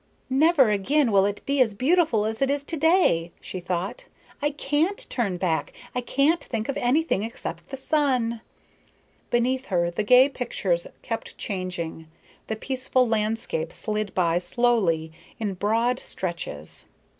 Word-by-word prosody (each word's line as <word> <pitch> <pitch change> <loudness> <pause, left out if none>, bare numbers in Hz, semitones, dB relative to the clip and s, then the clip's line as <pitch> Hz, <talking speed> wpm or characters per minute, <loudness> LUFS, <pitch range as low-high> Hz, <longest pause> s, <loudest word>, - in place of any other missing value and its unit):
"Never 275 -3 +5
again 245 +6 +2
will 195 -1 +5
it 205 0 -4
be 280 -1 +2
as 220 -5 +2
beautiful 275 - +2
as 220 +2 -3
it 270 - +3
is 280 0 0
to 325 - -3
day," 315 - +3
she 185 - -6
thought. 185 - -4 0.3
"I 295 - +2
can't 295 +6 -1
turn 205 -8 0
back. 175 -3 -1 0.2
I 250 - -1
can't 280 +7 +2
think 225 -2 -3
of 275 - -1
anything 260 -2 +2
except 225 +2 -6
the 270 - -5
sun." 255 -6 0 0.9
Beneath 255 +2 +1
her 175 -3 0
the 175 - -2
gay 250 +5 +7
pictures 195 -10 -1 0.2
kept 225 - -5
changing, 180 -5 -4 0.4
the 220 - -2
peaceful 255 +1 0
landscape 215 -7 -1
slid 215 -2 -3
by 175 -2 +2
slowly, 180 -6 +1 0.3
in 210 -3 -1
broad 230 +6 +1
stretches. 170 -3 -5
230 Hz, 145 wpm, -25 LUFS, 190-270 Hz, 0.9 s, gay